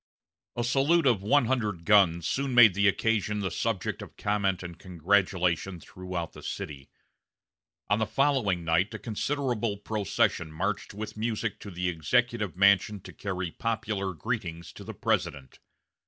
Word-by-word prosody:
A 120 Hz, -, -1 dB
salute 140 Hz, +7 st, +3 dB
of 120 Hz, -7 st, +3 dB
one 120 Hz, +6 st, +3 dB
hundred 105 Hz, -9 st, -1 dB
guns 85 Hz, -6 st, +4 dB
soon 135 Hz, -, -1 dB
made 115 Hz, -5 st, +8 dB
the 100 Hz, +2 st, +3 dB
occasion 105 Hz, 0 st, +1 dB
the 95 Hz, -3 st, -2 dB
subject 110 Hz, +1 st, -2 dB
of -, -, -11 dB
comment 100 Hz, -3 st, 0 dB
and 85 Hz, -1 st, -8 dB
congratulation 90 Hz, 0 st, 0 dB
throughout 90 Hz, -1 st, -6 dB
the -, -, -11 dB
city. 70 Hz, -2 st, -6 dB, 1.0 s
On 105 Hz, +1 st, +2 dB
the 110 Hz, -, 0 dB
following 110 Hz, -8 st, +1 dB
night 80 Hz, +6 st, +2 dB
a -, -, -3 dB
considerable 115 Hz, -1 st, -2 dB
procession 100 Hz, -6 st, -1 dB
marched 95 Hz, +5 st, -3 dB
with 110 Hz, +1 st, -6 dB
music 110 Hz, -1 st, -2 dB
to 100 Hz, -, -9 dB
the 90 Hz, -1 st, -3 dB
Executive 105 Hz, -, 0 dB
Mansion 100 Hz, +1 st, +4 dB
to -, -, -11 dB
carry 90 Hz, -3 st, -4 dB
popular 105 Hz, -4 st, -2 dB
greetings 85 Hz, -5 st, -4 dB
to -, -, -10 dB
the -, -, -8 dB
President. 70 Hz, -3 st, -2 dB
100 Hz, 150 wpm, -28 LUFS, 90-115 Hz, 1.0 s, made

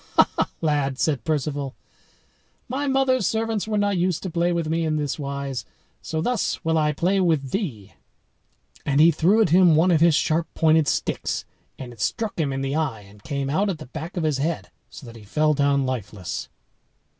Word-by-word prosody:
"Ha, -, -, +6 dB
ha, -, -, 0 dB
lad!" 145 Hz, -4 st, 0 dB
said 140 Hz, -5 st, 0 dB
Perceval, 145 Hz, -3 st, -2 dB, 0.9 s
"my 275 Hz, +3 st, -2 dB
mother's 265 Hz, -4 st, +2 dB
servants 225 Hz, -1 st, -1 dB
were 215 Hz, -1 st, 0 dB
not 205 Hz, -2 st, +1 dB
used 180 Hz, -2 st, 0 dB
to 185 Hz, -, -4 dB
play 170 Hz, +1 st, +1 dB
with 170 Hz, -2 st, -1 dB
me 165 Hz, +1 st, 0 dB
in 155 Hz, -1 st, 0 dB
this 150 Hz, 0 st, -2 dB
wise; 140 Hz, -2 st, -4 dB, 0.4 s
so 160 Hz, 0 st, -3 dB
thus 230 Hz, -3 st, -1 dB
will 160 Hz, 0 st, +2 dB
I 150 Hz, -1 st, +2 dB
play 180 Hz, +6 st, +1 dB
with 155 Hz, -8 st, +1 dB
thee." 135 Hz, -, -4 dB, 0.9 s
And 140 Hz, 0 st, +1 dB
he 165 Hz, +2 st, +7 dB
threw 185 Hz, +8 st, +3 dB
at 180 Hz, -, 0 dB
him 175 Hz, -1 st, +6 dB
one 170 Hz, +4 st, +4 dB
of 160 Hz, -2 st, +3 dB
his 165 Hz, -2 st, +5 dB
sharp 160 Hz, +1 st, +1 dB
pointed 160 Hz, -1 st, +3 dB
sticks, -, -, -1 dB, 0.3 s
and 125 Hz, -2 st, -8 dB
it 115 Hz, -, -12 dB
struck 205 Hz, -, -2 dB
him 145 Hz, -4 st, 0 dB
in 135 Hz, 0 st, -3 dB
the 135 Hz, +1 st, -2 dB
eye, 145 Hz, -9 st, -1 dB
and 100 Hz, +1 st, -17 dB
came 140 Hz, +2 st, -3 dB
out 190 Hz, +9 st, +1 dB
at 185 Hz, -, -2 dB
the 155 Hz, -, -9 dB
back 160 Hz, +8 st, -7 dB
of 170 Hz, -, 0 dB
his 150 Hz, -3 st, 0 dB
head, 160 Hz, +3 st, -2 dB, 0.2 s
so -, -, -11 dB
that 115 Hz, -1 st, -11 dB
he 115 Hz, -, -12 dB
fell 150 Hz, +9 st, +1 dB
down 140 Hz, -1 st, +2 dB
lifeless. 105 Hz, -7 st, -4 dB
155 Hz, 200 wpm, -23 LUFS, 140-175 Hz, 0.9 s, he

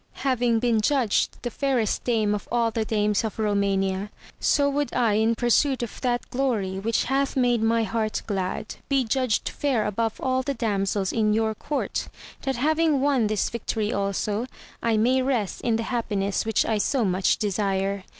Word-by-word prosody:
Having 245 Hz, -3 st, +2 dB
been 230 Hz, -1 st, +2 dB
judged 245 Hz, -2 st, +1 dB
the 240 Hz, -, -3 dB
fairest 255 Hz, -4 st, 0 dB
dame 220 Hz, -4 st, +1 dB
of 210 Hz, -, -4 dB
all 235 Hz, -1 st, +2 dB
the 225 Hz, 0 st, -1 dB
dames 210 Hz, -1 st, +1 dB
of 220 Hz, -, -4 dB
Eomania, 200 Hz, -2 st, 0 dB, 0.3 s
so 285 Hz, -1 st, +3 dB
would 285 Hz, 0 st, -1 dB
I 235 Hz, -4 st, +3 dB
in 220 Hz, +2 st, +2 dB
pursuit 245 Hz, +3 st, +2 dB
of 235 Hz, -, -7 dB
that 245 Hz, -2 st, -1 dB
glory 220 Hz, -8 st, -1 dB
which 225 Hz, +3 st, 0 dB
hath 270 Hz, +1 st, 0 dB
made 245 Hz, -3 st, +2 dB
my 225 Hz, +1 st, +2 dB
heart 215 Hz, +1 st, -2 dB
glad, 195 Hz, 0 st, -3 dB
be 275 Hz, -2 st, +3 dB
judged 250 Hz, -1 st, 0 dB
fair 260 Hz, -7 st, 0 dB
above 220 Hz, +2 st, -1 dB
all 260 Hz, 0 st, 0 dB
the 275 Hz, +1 st, -3 dB
damsels 200 Hz, -4 st, -1 dB
in 215 Hz, -2 st, +2 dB
your 220 Hz, 0 st, +1 dB
court, 285 Hz, +7 st, -3 dB, 0.3 s
that 270 Hz, -1 st, -1 dB
having 310 Hz, +3 st, +2 dB
won 265 Hz, -5 st, +2 dB
this 215 Hz, -1 st, 0 dB
victory 220 Hz, -1 st, -2 dB
also, 205 Hz, +3 st, -1 dB, 0.3 s
I 230 Hz, -2 st, +1 dB
may 250 Hz, +4 st, +3 dB
rest 250 Hz, -7 st, -1 dB
in 230 Hz, -2 st, +1 dB
the 230 Hz, -, -1 dB
happiness' 210 Hz, -4 st, -1 dB
which 220 Hz, -, +2 dB
I 220 Hz, -2 st, 0 dB
so 245 Hz, +3 st, +1 dB
much 185 Hz, 0 st, +2 dB
desire. 195 Hz, -2 st, -1 dB
225 Hz, 175 wpm, -25 LUFS, 210-255 Hz, 0.3 s, so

